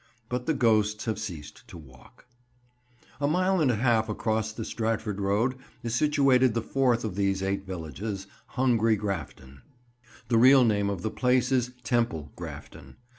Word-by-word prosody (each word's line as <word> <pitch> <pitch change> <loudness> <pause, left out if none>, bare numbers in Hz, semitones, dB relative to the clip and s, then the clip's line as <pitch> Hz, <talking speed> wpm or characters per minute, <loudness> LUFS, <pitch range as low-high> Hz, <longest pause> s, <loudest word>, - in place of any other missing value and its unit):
But 125 0 -3
the 160 - +1
ghosts 110 -4 +2
have 110 -2 -2
ceased 85 -9 -8
to - - -11
walk. 65 - -17
[Picture: 125 - -41 0.9
"Hungry 145 - 0
Grafton"] - - +1
A - - 0
mile 185 +1 +2
and 145 - +3
a 120 - +2
half 115 -1 +1
across 110 0 -1
the 110 0 -6
Stratford 110 -3 -2
road, 105 +6 +1 0.3
is 115 -1 -3
situated 130 -3 +3
the 115 - -1
fourth 125 -4 +1
of 105 - -3
these 95 -1 0
eight 95 0 -2
villages, 95 +3 -5 0.3
"Hungry" 115 -4 +3
Grafton. 80 -9 -6 0.7
The 115 -1 +3
real 130 +2 +7
name 100 -3 +1
of 100 -3 -4
the 110 - -2
place 125 0 +1
is 125 -1 +1
Temple 115 - -1
Grafton. - - -10
110 Hz, 175 wpm, -27 LUFS, 100-125 Hz, 0.9 s, real